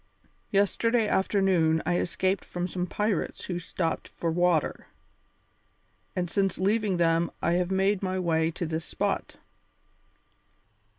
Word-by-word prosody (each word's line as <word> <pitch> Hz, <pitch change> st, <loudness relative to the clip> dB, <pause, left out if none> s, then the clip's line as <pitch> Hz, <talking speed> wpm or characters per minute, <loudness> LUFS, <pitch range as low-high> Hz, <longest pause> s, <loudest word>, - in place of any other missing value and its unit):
Yesterday 220 Hz, +3 st, +2 dB
afternoon 190 Hz, -5 st, +2 dB
I 175 Hz, 0 st, +1 dB
escaped 190 Hz, +2 st, 0 dB
from 175 Hz, 0 st, -3 dB
some 180 Hz, 0 st, -3 dB
pirates 210 Hz, -2 st, -1 dB
who 175 Hz, -2 st, -3 dB
stopped 165 Hz, -1 st, -2 dB
for 165 Hz, -, -3 dB
water, 175 Hz, -2 st, +1 dB, 1.3 s
and 180 Hz, -1 st, 0 dB
since 195 Hz, +1 st, 0 dB
leaving 200 Hz, 0 st, +1 dB
them 165 Hz, -1 st, +2 dB
I 170 Hz, -, +1 dB
have 175 Hz, +1 st, +1 dB
made 195 Hz, +1 st, +2 dB
my 185 Hz, -1 st, -1 dB
way 165 Hz, -3 st, +1 dB
to 170 Hz, +1 st, -4 dB
this 160 Hz, 0 st, -3 dB
spot." -, -, -2 dB
180 Hz, 125 wpm, -27 LUFS, 170-195 Hz, 1.3 s, Yesterday